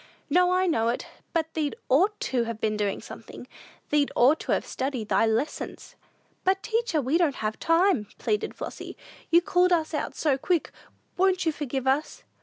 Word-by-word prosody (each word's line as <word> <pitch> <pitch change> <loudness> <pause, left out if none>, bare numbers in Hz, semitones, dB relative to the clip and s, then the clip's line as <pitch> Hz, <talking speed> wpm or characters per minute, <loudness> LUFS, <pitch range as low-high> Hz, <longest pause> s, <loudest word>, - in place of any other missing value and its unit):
"No, 360 +3 +4
I 370 +1 +3
know 230 -10 +2
it; 240 - -2 0.3
but 320 -1 -1
thee'd 305 +1 -1
ought 380 +11 +3
to 245 -3 0
have 230 -1 -5
been 215 -1 0
doing 205 -2 -1
something; 230 - -10 0.5
thee'd 295 -1 +2
ought 275 +6 +5
to - - -4
have - - +1
studied 260 -5 -3
thy 225 - +3
lessons." 230 +7 -3 0.5
"But, 385 +2 +1
teacher, 455 -8 0
we 285 +5 +1
didn't 310 -6 +2
have 215 0 -3
time," 330 - +3
pleaded 210 -2 -1
Flossy; - - -7 0.3
"you 340 +1 +5
called 360 0 +3
us 325 -2 +1
out 300 - -3
so 280 -4 +1
quick! 345 +2 0 0.5
Won't 370 -1 +2
you 320 - +3
forgive 275 -3 -4
us!" 270 +4 0
300 Hz, 180 wpm, -26 LUFS, 245-355 Hz, 0.5 s, ought